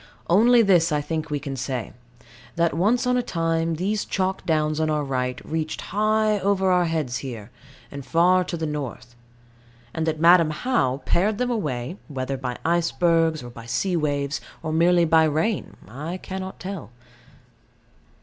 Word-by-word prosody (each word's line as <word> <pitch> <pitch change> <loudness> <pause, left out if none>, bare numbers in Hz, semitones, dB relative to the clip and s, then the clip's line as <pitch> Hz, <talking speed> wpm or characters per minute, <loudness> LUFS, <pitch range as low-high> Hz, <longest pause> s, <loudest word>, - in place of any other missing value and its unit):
Only 230 +5 +6
this 175 -5 +4
I 150 - +2
think 160 +1 -3
we 145 -1 -1
can 140 -1 -5
say 130 -2 -4 0.6
that 170 0 +1
once 215 - +2
on 250 0 +2
a - - +2
time 165 -4 -1
these 200 +5 -1
chalk 190 0 -2
downs 155 -1 +1
on 155 0 +1
our 150 -1 0
right 125 -2 -2
reached 160 -1 -3
high 215 0 +2
over 190 -1 +1
our 180 -1 +3
heads 155 -7 -1
here, 120 -5 -7 0.4
and 140 -1 -7
far 180 +5 +3
to 170 - -4
the 160 - -2
north; 135 -5 -5 0.8
and 160 0 -2
that 155 -1 -1
Madam 170 -1 +6
How 150 - 0
pared 205 +4 +1
them 250 +1 -1
away, 150 - -3
whether 135 -2 -3
by 125 -2 -4
icebergs, 165 -2 +2
or 120 - -9
by 115 -1 -11
sea 185 +9 0
waves, 145 -2 -1 0.2
or 155 0 -2
merely 170 +1 +4
by 160 0 +5
rain, 160 +8 -1
I 150 +9 -6
cannot 190 0 -7
tell. 190 - -6
165 Hz, 165 wpm, -24 LUFS, 145-185 Hz, 0.8 s, Only